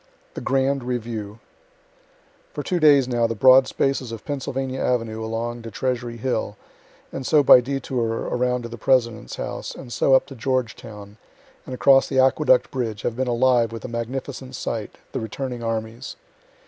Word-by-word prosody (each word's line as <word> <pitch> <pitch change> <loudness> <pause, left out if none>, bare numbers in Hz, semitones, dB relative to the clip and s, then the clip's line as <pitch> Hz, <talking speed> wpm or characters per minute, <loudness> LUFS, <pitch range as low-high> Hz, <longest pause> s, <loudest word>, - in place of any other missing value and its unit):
THE - - -6
GRAND 135 0 0
REVIEW 115 -4 -4 1.2
For - - -3
two 180 -2 -1
days 145 -5 +5
now 120 -2 +1
the 115 - -3
broad 130 +3 +6
spaces 135 -3 -1
of 115 -2 -8
Pennsylvania 135 -2 -3
avenue 115 -3 -1
along 115 +2 -4
to 115 - -8
Treasury 120 +1 -3
hill, 110 -4 -2 0.6
and 135 - -4
so 150 +2 +4
by 125 - +8
detour 125 -3 -2
around 125 0 -1
to - - -5
the 115 -1 -9
President's 115 - +1
house, - - -5
and 120 -3 -9
so 135 +4 +4
up - - +3
to 140 - -11
Georgetown, 110 -4 -4 0.5
and 130 - -5
across 135 +1 +5
the 135 - -3
aqueduct 135 - +3
bridge, 115 -5 -3
have 115 - -2
been 130 +1 -1
alive 120 -1 +2
with 115 -1 -7
a - - -3
magnificent 130 +2 -5
sight, 115 -3 -5
the - - -3
returning 120 +2 -5
armies. 115 +2 -4
125 Hz, 165 wpm, -23 LUFS, 115-130 Hz, 1.2 s, by